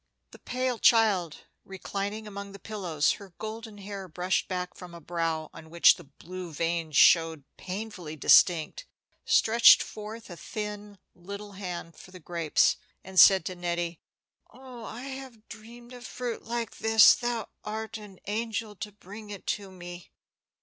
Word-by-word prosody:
The - - -14
pale 255 -2 -2
child, 200 -9 +3 0.2
reclining 200 +3 -5
among 200 -1 -8
the 200 - -10
pillows, 180 -9 0
her 195 -4 -14
golden 220 0 -7
hair 200 -1 -7
brushed 180 +2 -1
back 180 -1 -3
from 180 -2 -11
a - - -9
brow 165 -1 -3
on 160 0 -12
which 170 +1 +6
the - - -13
blue 175 +5 -9
veins 165 0 -2
showed 165 -3 +5
painfully 185 -5 -6
distinct, 175 - +4 0.4
stretched 230 +1 +6
forth 215 0 -9
a - - -7
thin 210 +2 -6 0.2
little 200 +3 -9
hand 180 -4 -7
for - - -13
the 185 0 -12
grapes, 165 -2 +1 0.3
and 190 -1 0
said 190 -4 +8
to 185 - -4
Nettie, 175 -1 -3 0.5
"Oh, 250 -1 -11
I 230 - -7
have 265 -5 -9
dreamed 235 +3 -12
of 245 0 -9
fruit 245 -2 -5
like 230 -1 -4
this; 220 0 +7
thou 240 -2 -3
art 220 +1 -5
an 205 -3 -12
angel 220 0 -3
to 210 - -6
bring 205 +2 -12
it 200 -2 -8
to 200 -2 -3
me." 175 -1 -10
200 Hz, 155 wpm, -28 LUFS, 175-220 Hz, 0.5 s, said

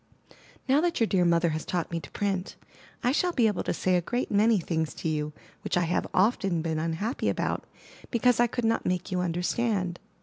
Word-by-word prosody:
Now 275 +3 +4
that 345 0 0
your 230 - +4
dear 190 -4 +2
mother 170 0 +3
has 155 0 -2
taught 175 -2 -2
me 170 - -1
to - - -11
print, 195 -2 -2 0.5
I 245 - +3
shall 355 +6 +1
be 240 - +3
able 210 -4 +1
to - - -2
say 185 +1 +1
a 175 - +3
great 245 +8 -2
many 215 +1 +4
things 160 -2 -2
to - - -4
you 150 -1 -1 0.3
which - - 0
I 175 - +3
have 170 +1 0
often 190 -4 +2
been 160 -1 -1
unhappy 165 - -1
about - - -1 0.4
because 245 0 +3
I 240 - +5
could 240 0 -2
not 225 0 +1
make 180 +1 -2
you 180 - 0
understand. 180 +2 -1
185 Hz, 210 wpm, -27 LUFS, 170-230 Hz, 0.5 s, I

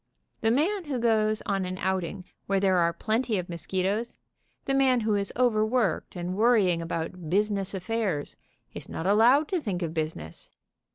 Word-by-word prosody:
The 225 - +1
man 340 - +1
who 285 -4 -2
goes 215 -2 +1
on 195 -1 0
an 185 0 -4
outing 190 0 -2 0.2
where 195 0 +2
there 190 -1 +3
are 170 -1 +3
plenty 220 +5 -1
of 180 -1 -3
mosquitoes, 190 +6 -2 0.5
the 270 - 0
man 265 -3 +3
who 215 -1 +1
is 200 -1 -1
overworked, 220 -6 +1
and 175 +1 -3
worrying 205 -6 +3
about 165 0 -4
business 200 +1 0
Affairs, 190 -6 -2 0.4
is - - -8
not 165 - -5
allowed 235 +9 +5
to 365 -3 0
think 190 -8 -3
of 165 -1 -3
business. 155 - -5
200 Hz, 165 wpm, -27 LUFS, 180-230 Hz, 0.5 s, allowed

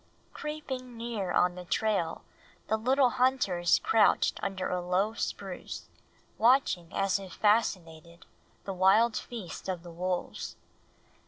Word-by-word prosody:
Creeping 265 -5 -6
near 225 -6 -3
on 180 0 +3
the 180 0 -8
trail 180 -3 -1 0.5
the 220 - +3
little 255 +3 +3
hunters 245 -10 +2
crouched 440 - +3
under 190 -1 -2
a 180 0 -1
low 185 +5 0
spruce, 195 -4 -5 0.5
watching 225 -8 +3
as 195 0 +1
if 190 -3 -9
fascinated 170 -6 0 0.4
the 195 - -4
wild 205 +5 +4
feast 210 -4 -6
of 180 -2 -3
the 175 - -10
wolves. 180 +1 -3
195 Hz, 120 wpm, -29 LUFS, 180-235 Hz, 0.5 s, wild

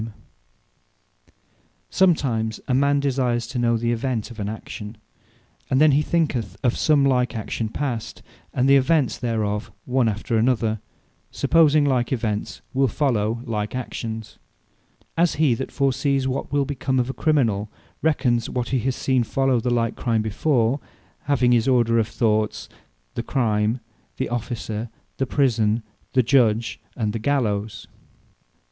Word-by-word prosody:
Prudence 110 -2 -8 1.7
Sometime 135 -12 +2 0.2
a 130 - +1
man 140 +2 +3
desires 125 -4 0
to 125 +1 -4
know 120 -1 +2
the 120 +1 0
event 120 -1 -2
of 115 - -10
an 100 0 -2
action; 110 0 -7 0.7
and 130 - +2
then 155 0 +6
he 140 +2 +3
thinketh 130 - -1
of 120 - +2
some 145 -3 +3
like 125 -2 +1
action 110 0 -3
past, 120 -3 -4 0.3
and 130 +1 +1
the 140 0 +7
events 140 0 +2
thereof 110 -3 -2
one 125 -2 +2
after 110 +2 -1
another; 115 -2 +1 0.5
supposing 155 -3 +4
like 125 -4 +1
events 110 -5 -2
will 135 0 +3
follow 115 -4 0
like 105 -1 -3
actions. 115 -3 -5 0.8
As 170 0 +2
he 150 -4 +3
that 130 +3 -4
foresees 140 0 +1
what 130 +1 -3
wil 145 -1 +2
become 130 -1 -2
of 125 -1 +1
a - - -11
Criminal, 115 -11 +1 0.3
re 160 -1 +3
cons 120 -4 0
what 125 -1 -2
he 130 - +1
has 130 +2 -1
seen 130 -2 +1
follow 135 +2 +1
on - - -1
the 125 - -1
like 115 -1 0
Crime 115 -3 0
before; 120 +3 +1 0.5
having 130 -4 +3
this 120 -1 +3
order 120 -3 +3
of 110 - +1
thoughts, 110 -2 0 0.5
The - - -2
Crime, 115 -2 0 0.4
the 130 - -2
Officer, 115 -1 -4 0.3
the 135 - -1
Prison, 115 -5 +1 0.3
the 130 -1 +4
Judge, 115 -3 +2 0.2
and 105 -3 -1
the 115 - -2
Gallowes. 110 -5 -1
120 Hz, 155 wpm, -23 LUFS, 110-135 Hz, 1.7 s, the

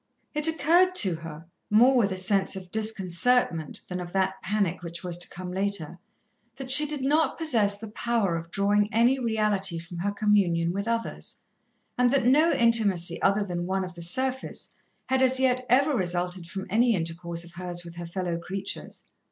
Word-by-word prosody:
It 300 +1 +2
occurred 340 +4 +3
to 195 - +4
her, 165 0 -10 0.2
more 245 +5 +5
with 215 -5 +2
a 190 - -3
sense 190 +1 0
of 185 -2 -9
disconcertment 215 - 0
than 180 0 -5
of 175 -1 -8
that 190 0 -1
panic 195 -3 -1
which 170 0 -7
was 175 -1 -2
to 175 - -3
come 180 0 -8
later, 185 -3 -2 0.6
that 265 -1 -2
she 300 +3 +9
did 295 -2 -2
not 305 +4 +1
possess 225 -11 +2
the 220 +2 -8
power 225 -6 -1
of 165 0 -6
drawing 205 +2 +1
any 240 +4 +3
reality 210 -6 0
from 170 +1 -8
her 195 +4 -1
communion 195 -5 +1
with 200 +2 -4
others, 230 0 -4 0.6
and 250 0 +4
that 265 -1 +1
no 300 +7 +4
intimacy 205 -8 +2
other 200 +2 +2
than 175 -2 -4
one 190 0 -1
of 180 -1 -7
the 170 - -11
surface 260 +10 -2 0.3
had 265 0 0
as 260 0 +3
yet 255 -1 +1
ever 275 +4 +3
resulted 180 -2 -2
from 190 0 -6
any 230 +2 +3
intercourse 170 0 -3
of 170 - -13
hers 175 0 -6
with 170 0 -11
her 175 -1 -6
fellow 175 -1 -3
creatures. 195 +3 -6
200 Hz, 185 wpm, -26 LUFS, 175-240 Hz, 0.6 s, she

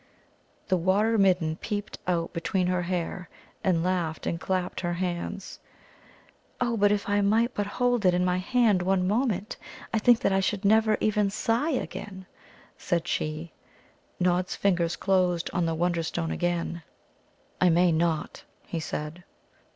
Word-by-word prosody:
The 185 - +2
Water 200 +6 +2
midden 180 -5 +2
peeped 205 -1 -5
out 170 -2 -1
between 180 +2 -1
her 180 0 +1
hair, 180 +1 -3 0.3
and 170 -3 +2
laughed 175 -3 -1
and 165 - -2
clapped 185 -1 -2
her 175 -1 -1
hands. 180 +2 -4 1.0
"Oh, 240 -1 0
but 205 -1 +3
if 205 -1 0
I 205 0 +2
might 225 +5 +2
but 205 -1 -2
hold 245 +1 0
it 180 - +4
in 180 0 +1
my 180 0 +1
hand 220 -2 +2
one 185 0 +1
moment, 210 -2 0 0.4
I 225 - +2
think 240 +2 +4
that 200 - +2
I 195 - +3
should 200 +1 -1
never 220 +1 +4
even 210 -1 +2
sigh 230 +9 0
again!" 205 -8 -4 0.5
said 175 0 -1
she. 155 +1 -3 0.7
Nod's 180 0 +1
fingers 175 -4 +1
closed 180 -3 +1
on 175 -2 +1
the 165 - -1
Wonderstone 170 -1 -1
again. 175 -1 -2 0.8
"I 185 - +6
may 175 +1 +4
not," 160 -1 -1 0.2
he 165 - -4
said. 155 +2 -5
185 Hz, 150 wpm, -27 LUFS, 175-205 Hz, 1.0 s, I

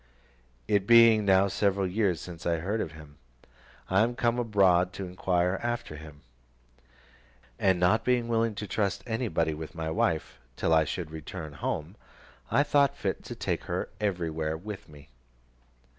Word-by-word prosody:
It 100 -1 +1
being 115 -2 +7
now 95 0 +5
several 100 0 +1
years 95 -2 0
since 85 -2 -7
I 85 - +2
heard 100 +7 -2
of 80 - -5
him, 75 -2 -14 0.7
I 95 +2 +3
am 120 +2 +1
come 120 -1 +1
abroad 95 -5 +3
to 100 - -5
inquire 90 0 0
after 120 -8 -3
him; 75 -1 -12 1.4
and 95 -2 +3
not 100 +5 +3
being 125 -1 +1
willing 115 -1 +1
to 105 - -5
trust 100 0 -1
anybody 110 -9 -1
with 80 +2 -8
my 80 -1 -3
wife, 80 0 -1 0.2
till 80 - +1
I 80 -1 +4
should 80 +1 -4
return 80 0 -7
home, 75 +5 -4 0.5
I 140 - +3
thought 140 -1 +2
fit 95 - -3
to - - -6
take - - -3
her - - -3
everywhere 80 -6 -2
with 100 +1 -8
me. 75 0 -15
95 Hz, 160 wpm, -28 LUFS, 80-110 Hz, 1.4 s, being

